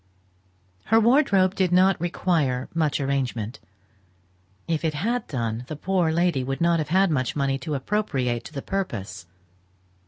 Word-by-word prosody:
Her 225 - +4
wardrobe 220 -6 +4
did 185 -3 0
not 185 0 +4
require 160 -7 0
much 155 -3 0
arrangement; 130 -5 -2 1.1
if 165 -1 -1
it 155 -2 0
had 230 +9 -1
done, 115 -4 -3
the 155 - -5
poor 175 +1 0
lady 170 -5 +1
would 135 +1 -3
not 170 0 +2
have 150 - -3
had 190 +1 +3
much 130 -5 -1
money 135 -1 0
to 145 +3 -3
appropriate 130 - -1
to - - -10
the 140 - -5
purpose. 100 - -4
155 Hz, 150 wpm, -24 LUFS, 130-185 Hz, 1.1 s, Her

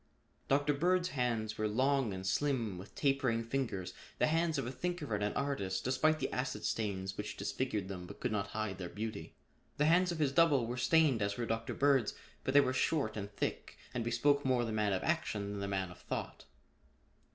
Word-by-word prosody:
Dr. 145 +2 +3
Bird's 180 +4 +2
hands 115 -6 -1
were 110 - +1
long 130 +2 +2
and 95 0 -5
slim 115 -2 0
with 95 - -11
tapering 135 -5 +1
fingers, 115 -7 -2 0.2
the - - +3
hands 165 +1 +1
of - - -1
a 125 - -3
thinker 175 -5 -3
and 105 0 0
an 105 - 0
artist 100 -10 -1
despite 130 +5 +2
the - - -2
acid 130 0 -2
stains 95 -3 -2
which 105 +1 -4
disfigured 105 -1 -2
them 90 -2 -6
but - - -10
could 125 - -1
not 100 -2 -1
hide 105 -2 -3
their 90 -2 -4
beauty. 110 -1 -5 0.4
The 150 - +3
hands 175 +3 +4
of 170 - -3
his 150 -3 +2
double 145 -5 +4
were 120 +2 -3
stained 140 -1 +3
as 100 0 0
were 120 - -1
Dr. 115 0 -2
Bird's, 135 -5 +3 0.3
but 130 - -1
they 145 - +9
were 130 -2 0
short 130 -5 +1
and 100 -2 -4
thick 100 - -3 0.2
and 120 - -1
bespoke 140 +5 +2
more 125 -2 +2
the 115 - -3
man 105 -1 +1
of 95 - 0
action 110 -11 -1
than 100 - -4
the 100 - -2
man 95 -2 -2
of 90 - -13
thought. - - -5
120 Hz, 210 wpm, -34 LUFS, 105-140 Hz, 0.4 s, they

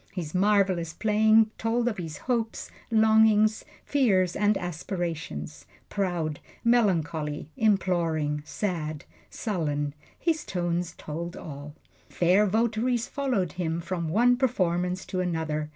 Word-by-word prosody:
His 165 -5 -5
marvelous 190 -4 +2
playing 220 0 +4
told 230 +2 0
of 215 -5 -1
his 160 -4 -5
hopes, 235 -3 -2 0.2
longings, 220 -1 +4 0.2
fears 195 -11 +2
and 205 0 +2
aspirations 160 - -5 0.2
proud, 175 -6 -2 0.2
melancholy, 165 -10 +1
imploring, 170 - +1
sad, 155 -4 -3 0.2
sullen 150 -9 -2 0.2
his 320 -2 0
tones 175 -1 -2
told 170 +3 -6
all. 145 0 -8 0.3
Fair 185 +4 +3
votaries 230 +3 +1
followed 245 - -1
him 170 -1 -2
from 170 -1 -3
one 240 +7 +4
performance 180 -7 0
to 185 - -3
another. 160 -4 -2
180 Hz, 110 wpm, -27 LUFS, 160-220 Hz, 0.3 s, playing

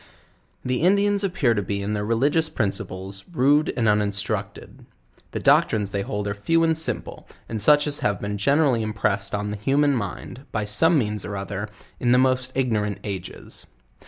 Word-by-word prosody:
The 125 +1 -1
Indians 200 +3 +3
appear 165 -11 +1
to 105 - -1
be 100 +1 -3
in 105 +2 -2
their 105 -1 -2
religious 140 +9 +1
principles, 95 -3 -3
rude 145 0 +3
and 115 -2 +1
uninstructed. 105 -1 -2 0.4
The - - -4
doctrines 105 -2 +3
they 100 - -1
hold 105 +1 -3
are 100 - -1
few 165 +11 +1
and 165 - +3
102 160 0 0
JOURNAL - - -7
OF - - -23
simple, - - -21
and 110 -2 -3
such 145 +6 +5
as 145 -1 0
have 100 -2 0
been 105 0 -4
generally 140 0 +3
impressed 105 -2 -1
on 105 0 -3
the 105 - -4
human 140 +7 +2
mind, 120 +4 -5
by 105 -2 -2
eome 165 +11 +3
means 105 -6 -1
or 100 - -5
other, 100 +2 -5 0.3
in 120 0 +2
the - - +5
most 130 0 +2
ignorant 110 -6 0
ages. 95 -4 -7
110 Hz, 190 wpm, -23 LUFS, 100-140 Hz, 0.4 s, such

